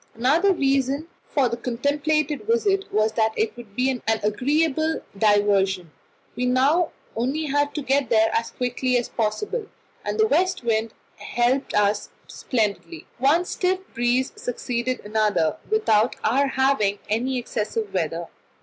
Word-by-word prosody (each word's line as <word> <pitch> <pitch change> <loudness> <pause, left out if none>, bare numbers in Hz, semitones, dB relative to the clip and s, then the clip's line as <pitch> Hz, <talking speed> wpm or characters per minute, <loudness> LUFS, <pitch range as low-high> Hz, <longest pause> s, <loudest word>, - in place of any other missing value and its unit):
Another 295 - +3
reason 275 -1 0 0.2
for 275 -3 +2
the 235 0 -3
contemplated 290 - -1
visit 415 -4 +1
was 215 +1 +2
that 220 0 +1
it 220 - 0
would 230 -4 -12
be 255 +2 +2
an 250 - -4
agreeable 285 +9 +1
diversion. 195 -4 +2 0.4
We 250 +1 -1
now 280 +7 +3 0.3
only 265 +7 -1
had 290 0 0
to 300 - -3
get 270 -2 +1
there 220 0 +4
as 230 0 0
quickly 250 0 -1
as 240 - -2
possible, 415 - -2 0.4
and - - -3
the 435 - +6
west 370 - +1
wind 225 -1 0 0.2
helped 245 +3 0
us 205 0 +1 0.2
splendidly; 200 - -3
one 300 +7 +3
stiff 370 +1 0 0.2
breeze 245 +2 +1
succeeded 245 +1 -3
another, 210 -6 +1
without 240 - +2
our 270 +6 +2
having 265 -7 +1
any 250 +5 0
excessive 245 - -3
weather. - - -1
250 Hz, 140 wpm, -23 LUFS, 220-290 Hz, 0.4 s, the